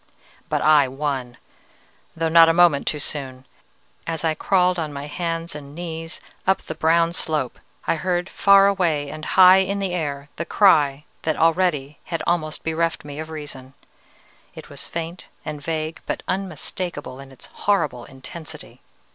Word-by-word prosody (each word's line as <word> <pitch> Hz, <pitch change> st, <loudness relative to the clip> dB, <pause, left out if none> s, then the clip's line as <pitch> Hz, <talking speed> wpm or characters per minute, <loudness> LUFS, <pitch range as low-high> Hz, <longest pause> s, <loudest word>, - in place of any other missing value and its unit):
"But -, -, 0 dB
I 150 Hz, -3 st, +6 dB
won! 130 Hz, -3 st, -3 dB, 0.8 s
though 165 Hz, 0 st, 0 dB
not 165 Hz, 0 st, +7 dB
a -, -, +4 dB
moment 170 Hz, -4 st, +4 dB
too 150 Hz, -, 0 dB
soon. 135 Hz, -3 st, -6 dB, 0.6 s
As 165 Hz, -1 st, -2 dB
I 160 Hz, -, +2 dB
crawled 180 Hz, +2 st, +2 dB
on 155 Hz, -2 st, -3 dB
my 140 Hz, 0 st, -6 dB
hands 165 Hz, +2 st, -3 dB
and 145 Hz, -1 st, -9 dB
knees 165 Hz, -1 st, -6 dB, 0.3 s
up 190 Hz, -1 st, +2 dB
the -, -, -5 dB
brown 165 Hz, +2 st, +2 dB
slope, 155 Hz, -7 st, -1 dB, 0.3 s
I -, -, +1 dB
heard, 175 Hz, +1 st, -1 dB
far 200 Hz, 0 st, +5 dB
away 170 Hz, -8 st, +1 dB
and 155 Hz, -, -8 dB
high 185 Hz, 0 st, +7 dB
in 195 Hz, +1 st, 0 dB
the 195 Hz, -2 st, -2 dB
air, 145 Hz, -4 st, -3 dB
the 170 Hz, -, -2 dB
cry 150 Hz, -8 st, +4 dB, 0.2 s
that 155 Hz, -, -1 dB
already 160 Hz, -4 st, +1 dB
had 165 Hz, -2 st, -3 dB
almost 155 Hz, -3 st, -1 dB
bereft 160 Hz, -1 st, -1 dB
me 145 Hz, 0 st, -7 dB
of 155 Hz, 0 st, -6 dB
reason. 145 Hz, -4 st, -8 dB, 0.8 s
It -, -, -11 dB
was -, -, -7 dB
faint 170 Hz, +2 st, -6 dB, 0.2 s
and 150 Hz, -2 st, -5 dB
vague, 155 Hz, +1 st, -3 dB
but -, -, -3 dB
unmistakable 180 Hz, -7 st, -4 dB
in 135 Hz, 0 st, -11 dB
its 135 Hz, -, -14 dB
horrible 150 Hz, -12 st, 0 dB
intensity. 140 Hz, +4 st, -10 dB
160 Hz, 160 wpm, -22 LUFS, 145-175 Hz, 0.8 s, not